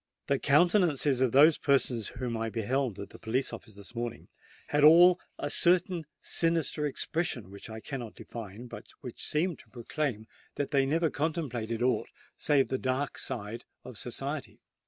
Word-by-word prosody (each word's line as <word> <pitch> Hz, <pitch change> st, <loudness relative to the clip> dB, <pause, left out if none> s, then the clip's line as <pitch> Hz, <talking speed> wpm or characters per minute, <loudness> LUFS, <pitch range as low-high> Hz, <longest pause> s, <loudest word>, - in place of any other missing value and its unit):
"The 140 Hz, -1 st, +1 dB
countenances 150 Hz, -4 st, +3 dB
of 130 Hz, -3 st, +3 dB
those 150 Hz, +5 st, +6 dB
persons 130 Hz, -6 st, +1 dB
whom 125 Hz, -3 st, -3 dB
I 115 Hz, 0 st, -2 dB
beheld 120 Hz, 0 st, -1 dB
at 100 Hz, -, -7 dB
the -, -, -13 dB
police 125 Hz, +4 st, -1 dB
office 110 Hz, -4 st, -9 dB
this 100 Hz, +1 st, -7 dB
morning, 120 Hz, -1 st, -5 dB, 0.4 s
had 145 Hz, 0 st, +2 dB
all 175 Hz, +4 st, +8 dB, 0.2 s
a -, -, -3 dB
certain 175 Hz, -2 st, +2 dB
sinister 165 Hz, -3 st, +1 dB
expression 140 Hz, -, -2 dB
which 100 Hz, +3 st, -9 dB
I 110 Hz, 0 st, -7 dB
cannot 120 Hz, -4 st, -6 dB
define, 115 Hz, 0 st, -8 dB
but 120 Hz, -1 st, -10 dB
which 125 Hz, -3 st, -8 dB
seemed 165 Hz, +2 st, 0 dB
to -, -, -17 dB
proclaim 120 Hz, -2 st, -3 dB, 0.3 s
that 145 Hz, -, -2 dB
they 135 Hz, -2 st, +3 dB
never 160 Hz, +2 st, +1 dB
contemplated 125 Hz, -8 st, -2 dB
aught 125 Hz, -3 st, +1 dB, 0.3 s
save 145 Hz, -3 st, +2 dB
the 130 Hz, -, -1 dB
dark 130 Hz, +2 st, -1 dB
side 115 Hz, -3 st, -4 dB, 0.2 s
of 125 Hz, -, -10 dB
society." 135 Hz, +6 st, -5 dB
135 Hz, 160 wpm, -30 LUFS, 115-150 Hz, 0.4 s, all